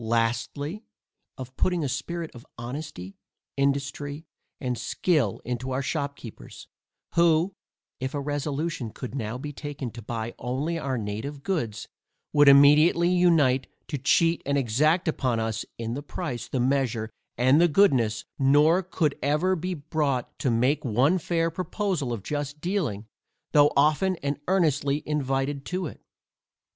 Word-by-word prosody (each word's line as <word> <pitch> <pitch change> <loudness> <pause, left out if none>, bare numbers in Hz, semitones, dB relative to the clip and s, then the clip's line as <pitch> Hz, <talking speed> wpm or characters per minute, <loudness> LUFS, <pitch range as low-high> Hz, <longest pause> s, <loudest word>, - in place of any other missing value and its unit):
Lastly, 115 - -1 0.5
of 130 0 -8
putting 180 -3 +1
a - - 0
spirit 160 +5 -4
of 120 - -12
honesty, 120 - -7 0.4
industry, 140 +2 -1 0.3
and 125 -2 -2
skill 155 +5 0
into 125 +1 -3
our 130 +1 -1
shopkeepers, 140 -6 -5 0.5
who, 170 +2 +3 0.5
if 130 +3 -3
a - - -1
resolution 145 -1 -2
could 125 +3 -8
now 115 -3 -3
be 145 +3 -6
taken 140 -4 -6
to 120 - -9
buy 115 +1 -4
only 140 +8 -2
our 135 -4 -2
native 115 +7 -5
goods, 120 - -2 0.5
would 145 -1 +6
immediately 150 +5 +7
unite 165 -8 +3 0.2
to 145 - -3
cheat 165 +5 +3
and 140 0 0
exact 150 +8 +2
upon 130 -7 0
us 110 0 -2
in 115 0 -3
the 140 - -4
price, 145 -4 -5
the 130 - -2
measure, 125 -4 0 0.3
and 130 +6 +5
the 175 - +6
goodness, 130 - +3
nor 150 +6 +5
could 165 -5 0
ever 150 +6 +1
yet 185 -4 0
be 180 0 -2
brought 145 -4 -2
to 130 - +1
make 130 +7 +2
one 135 - +2
fair 165 0 0
proposal 185 - -2
of 115 -5 -4
just 145 +2 -4
dealing, 155 - -2 0.5
though 145 0 +6
often 155 +6 +3
and 140 0 -1
earnestly 150 -6 +1
invited 135 -1 -1
to 180 +3 -3
it. - - -8
140 Hz, 145 wpm, -26 LUFS, 125-160 Hz, 0.5 s, immediately